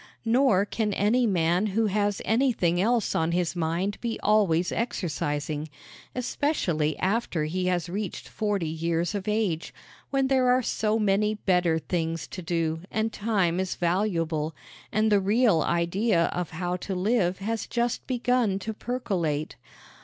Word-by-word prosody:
Nor 230 -4 +4
can 210 0 -1
any 230 +5 +2
man 175 +1 +2
who 225 - +3
has 205 -1 0
anything 220 -7 +2
else 230 +1 +1
on 165 +1 +1
his 175 0 0
mind 175 +4 -1
be 235 -1 -3
always 190 -5 +3
exercising 150 - -2 0.5
especially 195 - 0
after 190 -4 0
he 180 +4 -1
has 180 -1 0
reached 195 +1 -4
forty 205 -6 -1
years 165 +2 -1
of 200 -1 -4
age, 210 -7 -1 0.3
when 270 -1 +1
there 260 -1 +3
are 250 +1 +3
so 220 -1 0
many 210 0 +2
better 180 -5 +2
things 165 -1 -2
to 185 - -6
do 165 -2 -1
and 220 +1 -1
time 195 -5 +1
is 190 -1 -2
valuable, 170 -4 0 0.4
and 215 0 +2
the 205 - +5
real 205 -2 +3
idea 170 +4 +1
of 180 -2 -3
how 180 +1 -3
to 190 +1 -4
live 185 -1 +1
has 220 +3 -3
just 240 0 -1
begun 245 -5 +1
to 220 +3 -4
percolate. 185 - -2
190 Hz, 145 wpm, -26 LUFS, 170-220 Hz, 0.5 s, the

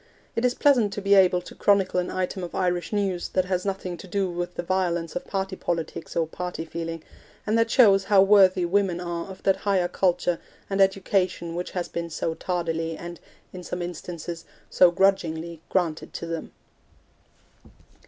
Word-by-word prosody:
It 230 - -1
is 250 0 +2
pleasant 245 -8 +3
to - - -4
be 200 +1 +3
able 185 -2 +5
to - - -11
chronicle 195 -3 +2
an 180 - -2
item 185 0 -3
of 175 - -6
Irish 180 -1 0
news 195 -4 -1
that 185 -1 +2
has 185 +1 -1
nothing 185 -2 -3
to 190 - -11
do 190 0 -1
with 175 0 -4
the - - -3
violence 170 -3 -1
of 180 - -4
party 190 -1 -2
politics 165 -3 -4
or 165 - +2
party 180 0 -5
feeling, 165 0 -5 0.4
and 215 - +1
that 230 0 +3
shows 200 -6 +5
how 195 -2 +6
worthy 195 -3 +5
women 185 -1 +1
are 175 0 -4
of 190 - -11
that 195 -1 +3
higher 195 -3 +1
culture 175 -1 +1 0.3
and 195 0 +2
education 190 -3 +1
which 175 +1 -4
has 175 - -1
been 170 0 -4
so 160 0 -2
tardily 165 -2 -2
and, 175 -1 -8 0.3
in 185 - -7
some 180 0 -4
instances, 170 -1 -6 0.3
so 180 - +6
grudgingly 170 -3 0
granted 170 -4 -1
to - - -4
them. 165 -1 -5
180 Hz, 180 wpm, -25 LUFS, 170-195 Hz, 0.4 s, how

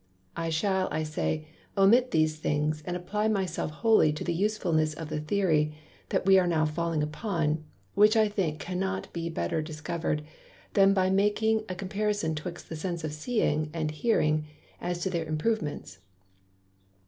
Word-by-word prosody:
I 165 0 -2
shall, 190 +4 +1
I 155 - -1
say, 155 0 -2 0.3
omit 235 +6 +5
these 155 -3 +2
things, 150 0 0
and 180 0 -1
apply 210 +4 -1
my 200 -3 +1
self 165 -2 -3
wholly 155 +1 +4
to 150 - -5
the 175 - -1
Usefulness 170 -5 +1
of 160 -1 -6
the 155 -1 -2
Theory, 155 -3 +1 0.3
that - - 0
we 190 0 +7
are 180 - +2
now 160 -2 +2
falling 160 0 -1
upon, 155 -1 -1 0.3
which 215 +2 +5
I 215 -1 +5
think 180 -7 -1
cannot 190 +3 -3
better 170 0 -2
be 155 - -7
discovered, 155 -1 -3 0.5
than 195 0 +5
by 185 -1 +2
making 215 +2 +2
a 185 - -3
comparison 200 -2 -1
'twixt 170 +3 -6
the 160 - -6
Senses 170 0 -4
of 155 -1 -3
Seeing 155 -3 0
and 155 -2 -1
Hearing, 155 -5 +1 0.3
as 175 0 -2
to 190 - -1
their 170 -2 -1
Improvements. 155 - -2
170 Hz, 165 wpm, -28 LUFS, 155-195 Hz, 0.5 s, we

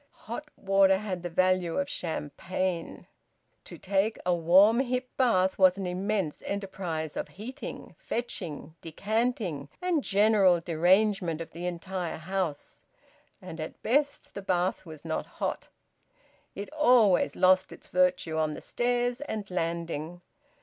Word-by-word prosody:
Hot 270 +7 -6
water 195 -1 +4
had 190 -3 -4
the 175 - -4
value 185 0 +1
of 280 - 0
champagne. 170 - -3 0.6
To - - -10
take 200 +3 0
a 180 - +3
warm 185 +7 +5
hip 255 -1 -1
bath 190 -8 +2
was 185 0 +6
an 195 - -3
immense 185 -2 -2
enterprise 190 -6 -4
of - - -3
heating, 250 +8 -8
fetching, 170 -10 -5
decanting, 195 - -2
and 355 -5 0
general 200 -3 +4
derangement 175 +1 +2
of 165 - -7
the 175 +2 -5
entire 180 0 -4
house; 170 -2 -4 0.6
and 160 - -8
at 155 - -7
best 285 +4 0
the 200 - -6
bath 185 -1 -1
was 155 -1 -11
not 160 - -2
hot; - - -3 0.9
it 205 +9 -7
always 245 - +4
lost 185 0 +4
its - - -12
virtue 180 -3 +1
on 155 -1 0
the - - -7
stairs 245 +1 -1
and 215 -9 -5
landing. 170 -1 -3
185 Hz, 135 wpm, -28 LUFS, 170-215 Hz, 0.9 s, was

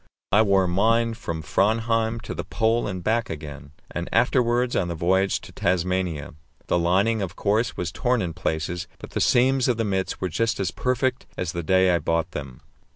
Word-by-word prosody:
I 105 - +6
wore 100 -3 +3
mine 115 +6 +2
from 85 -8 -5
Framheim 115 +5 +1
to - - -6
the - - -4
Pole 115 +1 0
and 95 -3 -5
back 115 +1 0
again, 75 -2 -7 0.2
and 85 +1 -4
afterwards 120 0 +2
on 90 - +1
the 85 - -3
voyage 95 +4 +2
to - - -12
Tasmania. 90 -3 -1 0.3
The - - +1
lining, 100 +6 +2
of 90 -3 -4
course, 110 +3 0
was 90 -1 -2
torn 125 +6 +1
in 85 -5 -2
places, 85 +1 -3
but - - -11
the - - -2
seams 130 +1 +3
of 125 -3 +1
the 115 - 0
mits 95 -2 -2
were 95 - -2
just 115 +6 0
as 95 - -1
perfect 130 0 -1
as 90 -3 -2
the 85 - -3
day 95 +2 +3
I 85 - +2
bought 85 +1 -1
them. 65 -5 -7
95 Hz, 195 wpm, -24 LUFS, 85-115 Hz, 0.3 s, I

